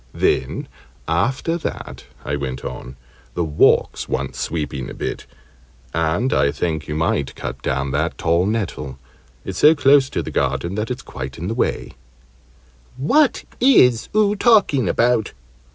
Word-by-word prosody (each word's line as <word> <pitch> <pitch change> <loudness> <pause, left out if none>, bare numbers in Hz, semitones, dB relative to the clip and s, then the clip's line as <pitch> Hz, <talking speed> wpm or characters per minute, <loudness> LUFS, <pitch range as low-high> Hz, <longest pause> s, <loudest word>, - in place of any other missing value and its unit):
"Then - - 0 0.4
after 130 - 0
that," - - -6 0.2
I 70 - -1
went 65 -3 -5
on, 65 0 -7 0.4
"the 85 - 0
walks 75 -2 +2
want - - -2
sweeping 75 -5 -3
a - - -8
bit; - - -5 0.7
and 80 +10 0
I 70 - +3
think 80 0 -3
you 75 - -3
might 75 -4 -1
cut 65 0 -6
down 70 +2 -1
that 80 +5 -1
tall 85 +3 +1
nettle 90 - -3 0.5
it's - - -5
so 155 +2 +7
close 140 -2 +4
to - - -2
the - - -6
garden 85 +2 -1
that 105 +2 -3
it's 125 - -5
quite 65 +1 -7
in 85 +4 -4
the - - -1
way - - -1 0.5
" 65 +1 -32 0.2
"What 275 - +2 0.2
is 125 - +5
oo 210 -1 +3
talking 200 - +3
about?" 120 -2 +1
85 Hz, 150 wpm, -20 LUFS, -, 0.7 s, so